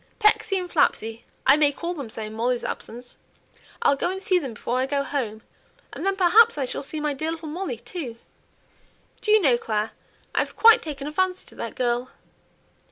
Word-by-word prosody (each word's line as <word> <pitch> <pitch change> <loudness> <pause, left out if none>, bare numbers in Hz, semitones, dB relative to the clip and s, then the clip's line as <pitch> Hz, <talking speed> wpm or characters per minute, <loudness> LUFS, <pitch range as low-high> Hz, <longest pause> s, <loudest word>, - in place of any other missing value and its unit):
Pecksy 425 -2 +3
and 365 -1 -3
Flapsy; 225 -9 0 0.2
I 275 - +7
may 295 -2 +4
call 340 +5 -4
them 280 -9 -6
so 220 - -5
in 215 0 -7
Molly's 240 +2 0
absence. 245 +2 -7 0.7
I'll 280 - +5
go 280 - -1
and 380 +1 -3
see 375 -1 +2
them 265 -8 -6
before 245 +4 -2
I 260 - 0
go 280 0 0
home, 230 -7 -3 0.5
and - - -6
then 390 0 +1
perhaps 395 +4 +5
I 275 - 0
shall - - -2
see 305 +2 -6
my 300 -1 -1
dear 315 +4 -3
little 325 -1 -5
Molly 330 -6 -4
too. 250 - -7 1.0
Do - - -4
you 430 +1 +7
know, 260 - +3
Clare, 215 -1 -1 0.4
I've - - -1
quite 455 0 +7
taken 285 -3 -6
a 300 - -4
fancy 370 +3 0
to - - -13
that - - -5
girl!" 245 0 0
285 Hz, 200 wpm, -24 LUFS, 245-360 Hz, 1.0 s, I